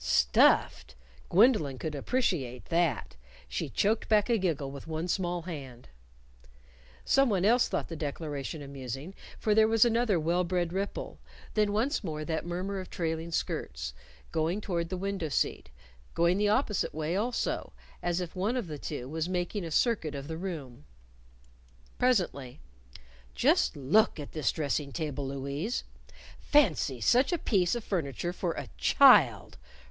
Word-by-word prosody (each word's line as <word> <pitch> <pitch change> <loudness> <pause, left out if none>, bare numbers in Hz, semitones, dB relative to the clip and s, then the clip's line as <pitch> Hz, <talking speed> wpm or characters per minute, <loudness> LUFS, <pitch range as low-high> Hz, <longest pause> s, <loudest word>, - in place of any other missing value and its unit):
Stuffed! - - +3 0.3
Gwendolyn 185 - +4
could 155 +3 -4
appreciate 145 - -1
that. 165 - 0 0.3
She - - -3
choked 215 +2 0
back 215 +1 +3
a 230 - +3
giggle 150 -7 -1
with 140 +2 -9
one 160 +2 -3
small 175 -2 -1
hand. 135 - -8 1.2
Someone 220 -9 +3
else 240 +3 +4
thought - - -2
the 165 - -6
declaration 150 -1 -4
amusing, 135 +4 -7 0.2
for 215 - +1
there 220 +1 +5
was 225 +1 +5
another 230 -5 +2
well 170 +3 +1
bred 175 -1 -1
ripple; 195 +2 -4 0.3
then 210 -1 +2
once 230 +8 0
more 155 -4 -4
that 160 +1 -3
murmur 185 +3 -3
of 185 - -7
trailing 165 0 -3
skirts, - - -3 0.4
going 165 +4 0
toward 170 -5 -2
the 185 - -3
window 195 -4 -3
seat; - - -1 0.5
going 170 +3 +3
the 210 0 +2
opposite 210 - 0
way 155 +2 -2
also, 235 +5 -1 0.3
as 175 0 0
if 180 0 -5
one 205 +7 0
of 245 - -2
the 150 -3 -7
two 130 -4 -5
was 160 +4 -3
making 180 +2 -2
a 165 - -5
circuit 165 - +1
of 140 0 -6
the 160 - -4
room. 160 - -6 1.2
Presently, 175 - 0 0.8
"Just - - +2
look 160 - +3
at 145 - -7
this 155 -3 0
dressing 145 -1 -2
table, 145 -3 -3
Louise! 140 - -3 0.6
Fancy 165 - +2
such 250 - +4
a 350 - +1
piece 195 - +1
of 240 - -4
furniture 175 - -2
for 175 -2 -2
a - - -6
_child! - - +5
170 Hz, 150 wpm, -29 LUFS, 145-205 Hz, 1.2 s, there